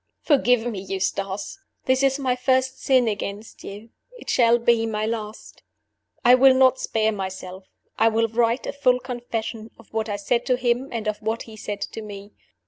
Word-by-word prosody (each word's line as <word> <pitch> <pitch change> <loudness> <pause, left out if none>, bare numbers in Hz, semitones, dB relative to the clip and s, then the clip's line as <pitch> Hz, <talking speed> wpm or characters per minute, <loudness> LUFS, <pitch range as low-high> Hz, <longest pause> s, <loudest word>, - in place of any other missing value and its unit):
"Forgive 245 -6 +3
me, 225 -5 -3
Eustace! 195 - -3 0.3
This 260 0 +2
is 270 0 +2
my 260 -3 0
first 260 +1 0
sin 255 -3 +3
against 205 0 -5
you. 210 +3 -9 0.3
It - - -5
shall 235 -1 +4
be 235 -1 +2
my 215 -1 -2
last. 220 -1 -6 0.6
"I 245 - +8
will 260 +1 +6
not 260 0 +4
spare 220 0 0
myself; 190 -2 -6 0.3
I 225 - +5
will 225 0 +2
write 230 +2 0
a - - -4
full 250 -3 +2
confession 235 -3 -5
of 225 - -19
what 220 0 -2
I 205 - -1
said 235 +4 0
to 255 - +3
him 245 +2 0
and 225 -2 -4
of 210 0 -2
what 220 +1 -2
he 220 - -12
said 205 -1 -6
to 220 - -5
me. 205 -1 -9
225 Hz, 185 wpm, -23 LUFS, 210-250 Hz, 0.6 s, I